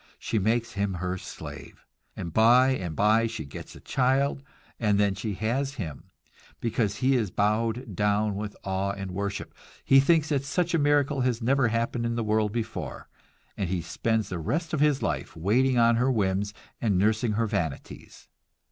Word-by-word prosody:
She 110 - -1
makes 115 +4 0
him 100 -1 -1
her 90 +1 -2
slave; - - -10 0.3
and 85 -2 -6
by 120 +5 +6
and 90 -12 -2
by 110 +4 +3
she 80 -9 -6
gets 70 - -9
a - - -11
child, 135 +2 +1 0.4
and 105 -3 +2
then 100 -1 +3
she 100 +1 -4
has 135 +7 -1
him, 80 - -7 0.5
because 110 -3 0
he 135 0 +4
is 110 -6 +1
bowed 110 +3 0
down 105 +1 +1
with 105 +1 -5
awe 95 +1 -1
and 95 -1 -6
worship, 100 +2 -4 0.3
he 135 - +7
thinks 160 +2 +3
that 140 -3 +1
such 170 +4 -1
a 165 - +3
miracle 145 -1 +2
has 125 -2 +1
never 130 +2 +2
happened 115 +1 -1
in 115 - -2
the 115 - -1
world 110 -1 +1
before, 115 0 -5 0.5
and 95 -4 -2
he 90 -2 -1
spends 110 +5 -1
the 90 - -4
rest 160 - -2
of 155 - 0
his 150 -2 +2
life - - -2
waiting 125 +9 +2
on 115 0 +5
her 125 +3 +2
whims 100 -3 0 0.3
and 105 -5 +2
nursing 110 +3 +2
her 115 +2 +1
vanities. 95 -9 -5
110 Hz, 180 wpm, -27 LUFS, 100-130 Hz, 0.5 s, he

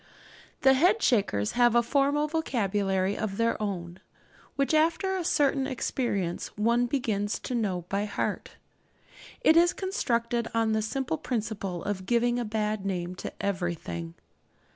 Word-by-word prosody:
The 265 - +6
Head 360 +11 +3
shakers 150 - +2
have 240 -1 +3
a 235 - +5
formal 285 +4 +2
vocabulary 205 - 0
of 200 -3 -3
their 230 -1 +1
own, 180 -3 -4 0.6
which, 275 +2 0
after 335 +5 +2
a 370 - -2
certain 280 -5 +2
experience, 235 -9 -2
one 235 +3 +2
begins 220 -6 -1
to - - -5
know 195 -7 -1
by 200 +2 -1
heart. 205 - -3 0.9
It 315 - +5
is 345 +1 +5
constructed 235 - -1
on 225 -1 +2
the 220 0 +1
simple 220 - -2
principle 210 -7 -3
of 190 -2 -4
giving 240 0 +2
a 240 - -2
bad 215 -1 -1
name 180 -2 -2
to - - -5
everything. 170 - -3
225 Hz, 140 wpm, -28 LUFS, 195-265 Hz, 0.9 s, The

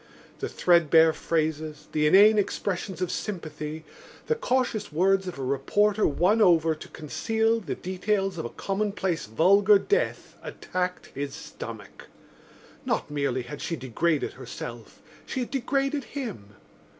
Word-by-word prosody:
The - - -3
threadbare 165 -2 +4
phrases, 155 -2 -2
the 150 -1 +2
inane 210 +6 +7
expressions 190 -1 -2
of 180 - -2
sympathy, 155 -5 -5 0.4
the 465 - +2
cautious 250 - -1
words 190 +4 +2
of 180 - -5
a 135 - -4
reporter 205 +11 +2
won 185 +9 +2
over 165 -5 +5
to 155 - -10
conceal 225 +9 0
the 185 -10 -4
details 195 0 -1
of - - -3
a - - -3
commonplace 195 - -2
vulgar 200 - +5
death 425 - -1
attacked 180 0 -4
his 140 +1 -4
stomach. - - -9 0.8
Not - - -2
merely 140 -3 -1
had 145 +4 -8
she 170 - -2
degraded 145 +4 -1
herself; - - -9 0.2
she 260 - -3
had 245 - -5
degraded 275 +1 -1
him. 200 - -7
180 Hz, 135 wpm, -26 LUFS, 155-210 Hz, 0.8 s, inane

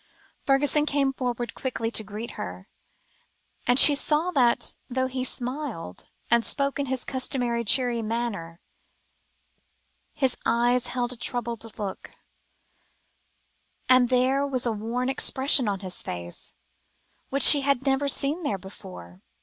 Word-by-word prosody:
Fergusson 290 +2 +2
came 275 -2 0
forward 245 -2 -4
quickly 230 -3 -4
to 220 - +1
greet 215 +3 -7
her, 90 0 -8 1.0
and 245 +2 +4
she 295 - +10
saw 305 +4 +1
that, 250 -7 +1 0.2
though 260 +1 -1
he 260 0 -4
smiled, 250 - -3 0.2
and 235 0 +4
spoke 280 +3 -1
in 280 - -2
his 260 -1 -2
customary, 245 -3 -1
cheery 245 0 +3
manner, 215 -7 -4 1.5
his 265 -3 0
eyes 240 +1 +1
held 245 0 -3
a - - -8
troubled 235 -2 -4
look, 200 -3 -6 1.8
and 255 -1 +4
there 260 +2 +1
was 255 -3 -2
a 235 - 0
worn 230 +4 -3
expression 265 -1 +2
on 200 -2 -2
his 185 -2 -4
face, 85 0 -5 0.7
which 275 0 +1
she 285 - +10
had 275 -1 0
never 270 +1 +1
seen 280 +4 0
there 250 - -2
before. 180 - -12
245 Hz, 135 wpm, -25 LUFS, 225-270 Hz, 1.8 s, she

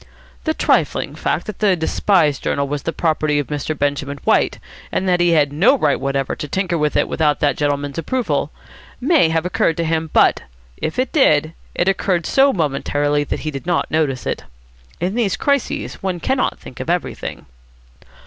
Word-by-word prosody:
The 315 -1 0
trifling - - +1
fact - - -2
that 215 -4 -7
the 200 -3 +3
despised 160 -2 +1
journal 140 0 -1
was 145 0 -3
the 165 - -2
property 155 -3 0
of 145 - 0
Mr. 150 +1 -3
Benjamin 140 0 -1
White, - - +2 0.3
and 190 - -1
that 180 -1 +3
he 175 0 +3
had 145 -3 +3
no 200 - +4
right - - +1
whatever 135 -1 -1
to 150 - -5
tinker 185 +2 -1
with 150 -2 0
it - - +2
without 150 -2 +1
that 145 -3 +2
gentleman's 145 0 -1
approval, 250 +9 -1 0.5
may 270 - +3
have 165 +1 0
occurred 165 -3 +1
to 170 - 0
him, 160 0 -1
but, - - +4 0.4
if 155 - -4
it 255 0 0
did, 155 - +3 0.2
it 175 - 0
occurred 185 -3 +1
so 275 +1 +4
momentarily 145 - 0
that - - -3
he 155 - -3
did 140 +4 -7
not 175 -2 0
notice 150 -5 0
it. - - -3 0.6
In 180 +3 -1
these 220 -5 0
crises 280 -3 -1
one 185 -2 -2
cannot 260 +7 0
think 125 - -12
of 130 - -5
everything. 175 0 -3
160 Hz, 185 wpm, -19 LUFS, 145-190 Hz, 0.6 s, no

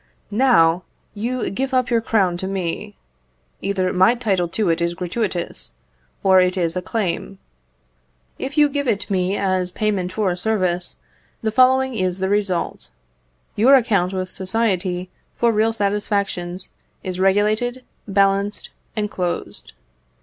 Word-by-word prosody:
_" - - -38 0.3
Now, 200 -8 +4 0.3
you 235 +4 -2
give 265 +6 -2
up 255 -1 +1
your 230 -1 +3
crown 195 -6 +2
to 190 - -4
me. 185 - -4 0.6
Either 190 -2 0
my 185 +6 +5
title 195 -7 0
to 180 +1 0
it 165 +1 -1
is 170 0 0
gratuitous, 180 0 -3 0.5
or 190 -1 +6
it 180 +1 +1
is 170 -2 0
a 180 - -1
claim. 195 -1 -2 1.0
If 275 +3 -5
you 295 -1 +6
give 285 -1 -2
it 205 -3 -1
me 185 +1 +1
as 185 -2 0
payment 200 -3 -1
for 195 -1 0
a - - -1
service, 180 -3 -1 0.5
the 220 - +1
following 260 +2 +4
is 185 -4 -1
the 190 0 -1
result: 190 - -1 0.7
your 255 +6 +6
account 200 -8 +2
with 185 -1 -3
society 185 -3 -1 0.2
for 235 -1 +3
real 220 +1 +2
satisfactions 200 -4 -1 0.3
is 185 -1 -4
regulated, 215 +6 +2 0.2
balanced, 200 +1 +1 0.2
and 210 -1 0
closed. 180 -2 -3
195 Hz, 140 wpm, -21 LUFS, 180-225 Hz, 1.0 s, or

